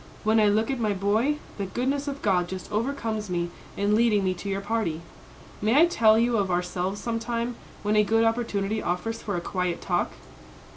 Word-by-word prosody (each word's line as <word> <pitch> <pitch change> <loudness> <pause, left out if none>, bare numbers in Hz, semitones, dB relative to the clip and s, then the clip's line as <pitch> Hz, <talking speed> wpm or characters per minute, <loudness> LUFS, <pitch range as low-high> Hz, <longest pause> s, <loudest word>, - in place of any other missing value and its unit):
When 220 0 +4
I 210 - +5
look 215 +4 +2
at 265 - -2
my 215 -3 +1
boy, 215 +9 +1 0.2
the 195 - -2
goodness 270 +7 -1
of 280 0 -5
God 180 -4 +2
just 185 0 -7
overcomes 220 -2 -2
me 175 -1 -1 0.3
in 205 +1 +2
leading 215 -2 +3
me 185 -1 +1
to 185 +3 -6
your 195 0 -1
party. 200 -6 -2 0.6
May 215 +4 +2
I 335 - +8
tell 220 -10 +4
you 235 0 +2
of 195 -2 0
ourselves 180 +2 -1
some 230 -1 -2
time, 235 +1 -2 0.3
when 210 +1 +1
a 210 - +5
good 225 +2 +2
opportunity 220 -2 0
offers 200 +6 -2
for 205 - -3
a - - -2
quiet 180 -1 -2
talk?" - - -1
215 Hz, 200 wpm, -26 LUFS, 195-230 Hz, 0.6 s, I